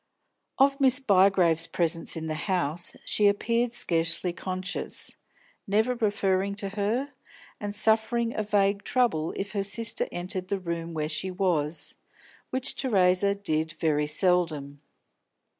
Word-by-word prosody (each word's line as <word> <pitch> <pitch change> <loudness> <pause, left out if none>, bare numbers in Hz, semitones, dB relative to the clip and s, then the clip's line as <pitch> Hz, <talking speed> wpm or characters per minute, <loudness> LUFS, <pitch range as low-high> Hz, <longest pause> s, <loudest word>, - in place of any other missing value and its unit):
Of 275 +1 +3
Miss 260 0 +4
Bygrave's 185 - +4
presence 165 -1 0
in 160 - -4
the 155 - -2 0.2
house 175 -2 -1
she 210 - +2
appeared 230 +4 +1
scarcely 170 -5 +1
conscious, 185 +1 -5 0.5
never 220 +5 +2
referring 200 -4 0
to 200 -1 -4
her, 220 +8 -2 0.5
and 205 0 -4
suffering 225 +2 +2
a - - -1
vague 200 -1 +1
trouble 235 -11 +1
if 200 +1 -4
her 200 -2 -1
sister 230 +3 -2
entered 180 +1 -4
the 200 +1 -2
room 170 -2 -4
where 150 -1 -1
she 175 +4 -2
was, 170 -5 -1 0.6
which 260 0 -1
Theresa 200 -4 +2
did 160 -5 -1
very 150 -2 0
seldom. 155 -4 0
195 Hz, 130 wpm, -27 LUFS, 170-215 Hz, 0.6 s, Miss